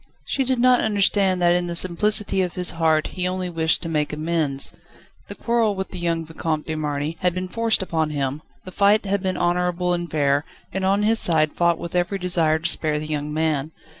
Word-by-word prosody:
She 270 - 0
did 260 0 0
not 250 +1 +4
understand 200 -3 +1
that 175 0 +5
in 175 0 0
the 170 - -3
simplicity 190 +3 +2
of 180 -2 -3
his 180 -1 0
heart, 160 -2 +1
he 180 -1 -2
only 185 -1 -3
wished 160 0 +1
to - - -4
make 150 -2 -1
amends. 155 -3 0 0.5
The - - -7
quarrel 230 -3 0
with 190 0 -4
the 185 - -7
young 165 -1 -1
Vicomte 160 -1 -3
de 160 - -4
Marny 150 +1 -3
had 180 -1 0
been 185 0 -3
forced 230 0 0
upon 160 -4 -1
him, 140 0 -3 0.2
the 185 - -8
fight 205 +3 +3
had 200 0 -1
been 185 -1 -2
honourable 180 0 0
and 175 -1 -3
fair, 145 -1 +1 0.3
and 190 +1 -2
on 195 +2 +2
his 225 +2 +3
side 155 -3 +3
fought 170 -1 +2
with 170 +1 -7
every 180 +3 0
desire 170 -4 +1
to 165 +1 -2
spare 155 -3 +2
the 150 - -4
young 150 -1 -3
man. 155 -1 -1
175 Hz, 215 wpm, -22 LUFS, 155-190 Hz, 0.5 s, that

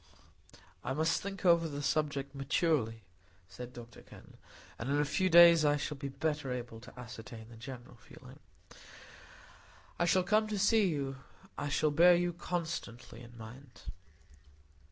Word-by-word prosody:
"I - - -2
must 155 +2 +1
think 195 -1 -6
over 170 -2 +5
the 145 0 -5
subject 140 -2 -1
maturely," 135 - 0 0.4
said 125 +5 -9
Dr 120 -1 -12
Kenn, - - -16 0.4
"and 115 - -4
in 145 +1 +1
a 150 - +2
few 185 +6 0
days 170 -1 +8
I 145 0 +3
shall 150 - -4
be 140 0 -6
better 150 -1 -3
able 120 -2 -5
to 125 +2 -14
ascertain 115 -1 -10
the 120 - -13
general 120 +1 -10
feeling. - - -15 1.6
I 175 - +3
shall 185 +1 +3
come 215 +3 +2
to 215 -1 -3
see 205 +1 +3
you; 140 -5 -3 0.4
I 145 - -3
shall 150 +1 +1
bear 175 +4 +6
you 175 0 0
constantly 160 -10 -5
in 120 0 -13
mind." 120 +4 -12
145 Hz, 155 wpm, -32 LUFS, 125-170 Hz, 1.6 s, days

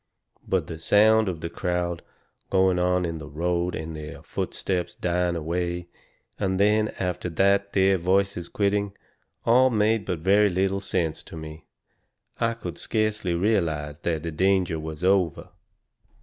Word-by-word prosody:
But - - +1
the 80 - -7
sound 110 +4 +4
of 85 -3 -5
the 85 - -3
crowd 90 -2 -2 0.5
going 95 -1 +3
into 90 -2 0
the 75 - -8
road, 85 +3 -1
and 80 0 -5
their 75 0 -8
footsteps 90 -3 -3
dying 90 0 0
away, 85 +2 -3 0.5
and 95 -2 0
then 105 +1 +3
after 90 -1 -2
that 100 +3 +2
their 95 -1 +3
voices 95 0 0
quitting, 100 0 0 0.5
all 130 +3 +5
made 110 -2 +1
but 90 - -2
very 100 +5 +4
little 95 +1 0
sense 85 -5 -1
to 80 - -10
me. 80 0 -9 0.7
I 115 0 +1
could 90 -7 -7
scarcely 105 -5 0
realize 85 -7 0
that 80 -2 -2
the 85 - -3
danger 90 -1 +1
was 80 +1 -7
over. 95 -3 +1
90 Hz, 145 wpm, -25 LUFS, 85-100 Hz, 0.7 s, all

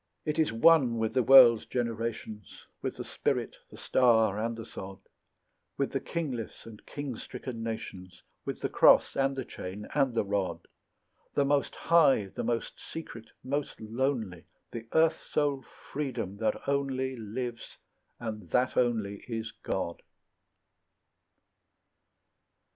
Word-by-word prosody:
It 150 +1 -1
is 155 - +3
one 125 0 +5
with 110 -1 -1
the 130 - +3
world's 120 -2 +8
generations, 115 -4 -4 0.2
With - - -3
the - - -5
spirit, - - -2
the - - -13
star, 110 -5 +3
and 115 0 -2
the 115 - -7
sod; 95 -3 -8 0.8
With 140 - 0
the 135 - 0
kingless 135 -6 -4
and 110 -2 -12
king 145 -4 -5
stricken 125 -2 -7
nations, 95 -5 -6 0.2
With - - -5
the - - 0
cross, - - +5
and 135 0 +1
the 130 -2 -4
chain, 100 +3 -7
and 135 -4 +2
the 115 - +2
rod; 100 -1 -1 0.7
The 140 - +3
most 140 0 +1
high, 140 - +4
the - - -3
most 115 0 -2
secret, 115 -8 -8
most 140 +2 -3
lonely, 110 -5 -2 0.3
The 115 -1 -7
earth 160 0 +3
soul 145 -3 +1 0.3
Freedom, 125 -9 -3
that 110 0 -1
only 135 -2 0
Lives, 115 +1 -6 0.4
and 105 -6 -6
that 125 +6 +1
only 110 -5 0
is 115 -2 -4
God. 85 -3 -3
120 Hz, 135 wpm, -29 LUFS, 110-135 Hz, 0.8 s, world's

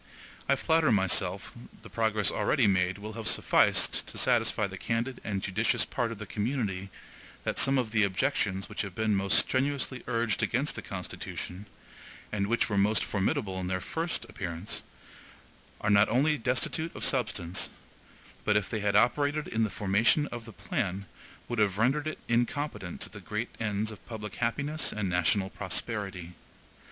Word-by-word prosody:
I 140 - +6
flatter 160 -1 +3
myself 95 -1 +1 0.3
the - - -9
progress 110 -2 +1
already 130 -6 +2
made 95 -1 +2
will 105 +2 -7
have 115 0 -3
sufficed - - +3
to - - -6
satisfy - - +2
the - - -6
candid 115 +3 -2
and 100 -2 -2
judicious 105 +4 +2
part 120 -3 -1
of 115 - -6
the 105 - -6
community 105 -4 -2 0.5
that - - -1
some 135 0 +5
of 120 -4 0
the 110 -1 +3
objections 95 -1 0
which - - -4
have 100 -4 -6
been 110 -1 +1
most 95 0 +3
strenuously 135 -1 +1
urged 115 -3 0
against - - 0
the - - -6
Constitution, 95 +4 -6 0.6
and 100 -1 0
which 120 +2 +2
were 100 -3 +1
most 105 +2 +3
formidable 95 -1 -1
in 90 - -3
their 95 0 -1
first 165 - -3
appearance, 90 -3 -4 1.0
are 105 - +2
not 100 +1 +6
only 145 +6 +3
destitute 130 +6 -1
of - - -2
substance, 95 -9 0 0.7
but 105 0 +3
if 100 -3 0
they 110 - -1
had 100 -1 +1
operated 145 +7 +3
in 110 0 0
the 110 - +1
formation 105 +9 +2
of 120 -1 -6
the 115 - -9
plan, 100 - -3 0.4
would 120 -2 -2
have 100 -2 +2
rendered 135 +7 +2
it 155 - -3
incompetent 120 - -1
to - - -3
the - - -10
great - - -3
ends 110 0 -1
of 100 -5 -11
public 105 -4 -6
happiness 140 +6 0
and 105 -2 -2
national 90 +2 +1
prosperity. 95 -3 -4
110 Hz, 165 wpm, -29 LUFS, 95-120 Hz, 1.0 s, I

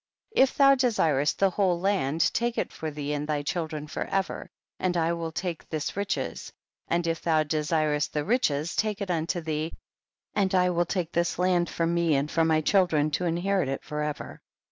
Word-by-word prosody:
19. - - +7
If 265 - 0
thou 275 -1 +7
desirest 165 - +2
the 195 -1 +3
whole 185 -2 +1
land 170 -5 +1
take 235 0 0
it - - -2
for 160 - -4
thee 145 -1 -4
and 145 0 -3
thy 150 -1 -1
children 155 -1 -3
for 150 - -4
ever, 195 -1 -2 0.3
and 180 -1 0
I 165 0 +2
will 165 -1 -4
take 170 0 -4
tiiis 155 -2 -3
riches, 200 0 -3 0.4
and 170 0 0
if 165 0 -1
thou 160 -2 +2
desirest 150 -1 0
the 150 -1 -2
riches 170 - +1
take 215 -2 0
it 200 -3 -2
unto 170 +1 -1
thee, 155 0 -3 0.6
and 190 -2 +1
I 180 0 +3
will 175 0 +1
take 175 -3 -2
this 170 0 0
land 180 -1 +2
for 165 - -1
me 170 -2 +2
and 140 +2 0
for 165 - +2
my 160 -1 +3
children 155 -4 +2
to 180 +5 -1
inherit 175 -1 0
it 135 - -3
for 150 0 -4
ever. 150 -1 -5
165 Hz, 200 wpm, -27 LUFS, 155-185 Hz, 0.6 s, 19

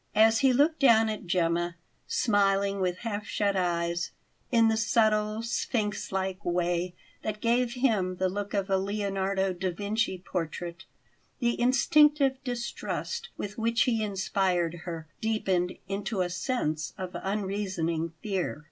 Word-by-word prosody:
As 220 +1 +6
he 270 -1 +5
looked 295 +5 +3
down 225 -4 +6
at 215 -3 -5
Gemma, 170 0 +1 0.3
smiling 200 -2 +2
with 180 -1 0
half 210 -2 -3
shut 200 -1 0
eyes, 170 -1 0 0.4
in 230 -2 +5
the 220 - +3
subtle, 215 -1 +2
sphinx 225 -2 -2
like 190 -1 -2
way 175 0 0 0.3
that 215 -1 -3
gave 240 +2 +2
him 215 -8 +1
the 185 +1 +1
look 205 +2 -3
of 195 -1 0
a 190 - +4
Leonardo 195 -1 -1
da 185 +1 -2
Vinci 205 +2 -1
portrait, 175 0 -5 0.5
the 240 -2 0
instinctive 270 +1 +4
distrust 245 - -4
with 205 +2 -5
which 230 +1 +2
he 230 -3 +1
inspired 190 -4 0
her 165 -3 -5
deepened 190 -5 0
into 200 +1 -2
a 175 -1 -1
sense 175 - -2
of 185 -1 -5
unreasoning 190 -5 -2
fear. 190 -7 -2
200 Hz, 140 wpm, -28 LUFS, 180-225 Hz, 0.5 s, As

